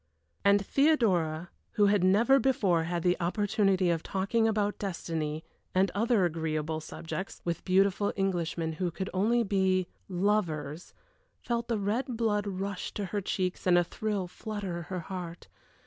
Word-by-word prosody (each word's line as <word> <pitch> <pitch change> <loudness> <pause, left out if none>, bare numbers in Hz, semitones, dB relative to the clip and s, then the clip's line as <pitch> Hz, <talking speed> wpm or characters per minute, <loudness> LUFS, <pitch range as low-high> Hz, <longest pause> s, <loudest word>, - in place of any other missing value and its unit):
And 200 0 +4
Theodora, 185 - +2 0.2
who 210 -2 +4
had 200 -2 +3
never 225 +9 +5
before 195 -12 +2
had 170 0 -2
the 180 0 +3
opportunity 195 0 +2
of 165 -2 0
talking 200 +6 0
about 210 -2 0
destiny, 160 -5 -3 0.3
and 190 0 +3
other 220 -1 +2
agreeable 160 -1 -2
subjects, 170 +4 -6
with 170 -1 -2
beautiful 195 +2 +2
Englishmen 170 -4 -1
who 180 - +1
could 190 +3 -5
only 225 +6 +2
be 190 -2 +2 0.2
lovers 175 -5 -1 0.4
felt 235 -1 -2
the 230 -2 0
red 225 +5 -1
blood 210 -3 +1
rush 195 0 -4
to 205 - -2
her 205 - 0
cheeks 185 -1 -2
and 175 -1 +6
a 175 - +5
thrill 205 +2 -2
flutter 195 -2 -5
her 185 -2 -3
heart. 175 -1 -7
190 Hz, 150 wpm, -29 LUFS, 175-210 Hz, 0.4 s, and